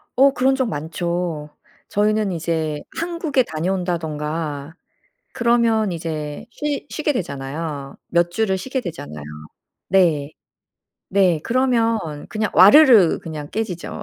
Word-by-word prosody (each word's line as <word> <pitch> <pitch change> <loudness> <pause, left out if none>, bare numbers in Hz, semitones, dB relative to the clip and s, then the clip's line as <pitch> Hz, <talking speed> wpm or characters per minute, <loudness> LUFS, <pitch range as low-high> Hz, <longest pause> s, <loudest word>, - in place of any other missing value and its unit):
어 275 +3 +6
그런 265 0 +2
적 260 -3 0
많죠. 170 -1 -3 0.4
저희는 210 0 +1
이제 160 -2 -2 0.2
한국에 335 -5 0
다녀온다든가 160 -4 -3 0.6
그러면 235 -3 +2
이제 155 -3 -5
쉬 295 +3 -3
쉬게 305 -1 -1
되잖아요. 140 - -5
몇 170 0 +2
주를 190 +1 0
쉬게 260 +7 -3
되잖아요. 75 - -7 0.6
네. 160 -6 +2 0.8
네. 185 -5 +3
그러면 235 -2 +2 0.3
그냥 215 -1 -2
와르르 225 - +7
그냥 155 -3 -7
깨지죠. 195 -5 -4
180 Hz, 240 characters per minute, -21 LUFS, 155-230 Hz, 0.8 s, 와르르